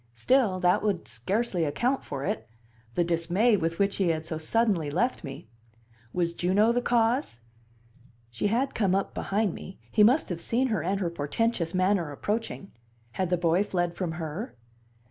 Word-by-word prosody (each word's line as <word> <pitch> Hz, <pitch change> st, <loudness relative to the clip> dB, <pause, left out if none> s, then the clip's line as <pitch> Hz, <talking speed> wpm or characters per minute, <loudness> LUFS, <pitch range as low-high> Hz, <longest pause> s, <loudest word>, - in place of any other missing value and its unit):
Still, 210 Hz, -, +2 dB
that 180 Hz, +3 st, +3 dB
would 205 Hz, -5 st, -1 dB
scarcely 190 Hz, -, -1 dB
account 240 Hz, -, 0 dB
for 140 Hz, -1 st, -5 dB
it 110 Hz, +1 st, -3 dB, 0.5 s
the 175 Hz, -, +3 dB
dismay 175 Hz, +7 st, +2 dB
with 165 Hz, -3 st, -1 dB
which 200 Hz, 0 st, +1 dB
he 190 Hz, -, +1 dB
had 160 Hz, -1 st, 0 dB
so 160 Hz, -1 st, -4 dB
suddenly 185 Hz, -2 st, +1 dB
left 210 Hz, -, 0 dB
me. 135 Hz, -6 st, -8 dB, 0.6 s
Was 170 Hz, +2 st, 0 dB
Juno 195 Hz, +6 st, +3 dB
the 245 Hz, +1 st, +1 dB
cause 235 Hz, -, +1 dB, 0.9 s
she 115 Hz, -, -1 dB
had 245 Hz, +6 st, 0 dB
come 195 Hz, -4 st, +2 dB
up 195 Hz, -, -1 dB
behind 200 Hz, -2 st, 0 dB
me; 190 Hz, -, -9 dB
he 215 Hz, -, +3 dB
must 255 Hz, +9 st, +4 dB
have 170 Hz, -2 st, -4 dB
seen 250 Hz, +8 st, 0 dB
her 215 Hz, -7 st, 0 dB
and 195 Hz, +4 st, -1 dB
her 175 Hz, -4 st, -1 dB
portentous 170 Hz, +3 st, -1 dB
manner 185 Hz, -4 st, +2 dB
approaching 205 Hz, +5 st, -3 dB, 0.4 s
had 185 Hz, +7 st, -2 dB
the 180 Hz, -, +2 dB
boy 170 Hz, +3 st, +2 dB
fled 175 Hz, -4 st, -1 dB
from 175 Hz, -2 st, -3 dB
her? 165 Hz, +7 st, -5 dB
185 Hz, 170 wpm, -27 LUFS, 165-220 Hz, 0.9 s, must